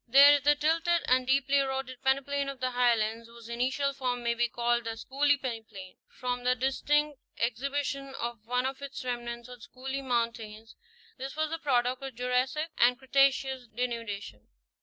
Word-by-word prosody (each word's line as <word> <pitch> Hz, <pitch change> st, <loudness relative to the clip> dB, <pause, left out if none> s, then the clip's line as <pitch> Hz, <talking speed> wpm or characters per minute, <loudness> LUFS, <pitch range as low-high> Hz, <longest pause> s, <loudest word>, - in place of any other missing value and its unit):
There 280 Hz, +4 st, +9 dB
is 290 Hz, -, +3 dB
the 295 Hz, +2 st, +4 dB
tilted 330 Hz, +3 st, +1 dB
and 255 Hz, 0 st, +3 dB
deeply 275 Hz, +1 st, +3 dB
eroded 265 Hz, -2 st, -2 dB
peneplain 275 Hz, +1 st, +1 dB
of 275 Hz, -2 st, -7 dB
the 255 Hz, 0 st, -1 dB
Highlands, 230 Hz, -2 st, +1 dB
whose 230 Hz, -1 st, -13 dB
initial 260 Hz, +4 st, 0 dB
form 250 Hz, -3 st, -2 dB
may 235 Hz, 0 st, +1 dB
be 240 Hz, 0 st, +1 dB
called 240 Hz, 0 st, 0 dB
the 225 Hz, 0 st, -4 dB
Schooley 285 Hz, +4 st, +1 dB
peneplain, 220 Hz, -7 st, -6 dB
from 250 Hz, -1 st, -4 dB
the 250 Hz, 0 st, +3 dB
dis 265 Hz, +1 st, -1 dB
tinct 295 Hz, -1 st, +1 dB, 0.2 s
exhibition 275 Hz, +3 st, -2 dB
of 235 Hz, -2 st, -5 dB
one 250 Hz, +1 st, 0 dB
of 265 Hz, +1 st, -3 dB
its 280 Hz, -2 st, -7 dB
remnants 240 Hz, -1 st, -4 dB
on 250 Hz, -1 st, -11 dB
Schooley's 265 Hz, +3 st, -5 dB
mountain; 230 Hz, -4 st, -2 dB, 0.5 s
this 265 Hz, +1 st, -5 dB
was 310 Hz, 0 st, -1 dB
the 330 Hz, -, -3 dB
product 250 Hz, -3 st, +1 dB
of 270 Hz, -3 st, -7 dB
Jurassic 250 Hz, +6 st, 0 dB
and 245 Hz, +1 st, +5 dB
Cretaceous 265 Hz, -1 st, +2 dB
denudation. 225 Hz, -, -5 dB
255 Hz, 170 wpm, -29 LUFS, 240-275 Hz, 0.5 s, There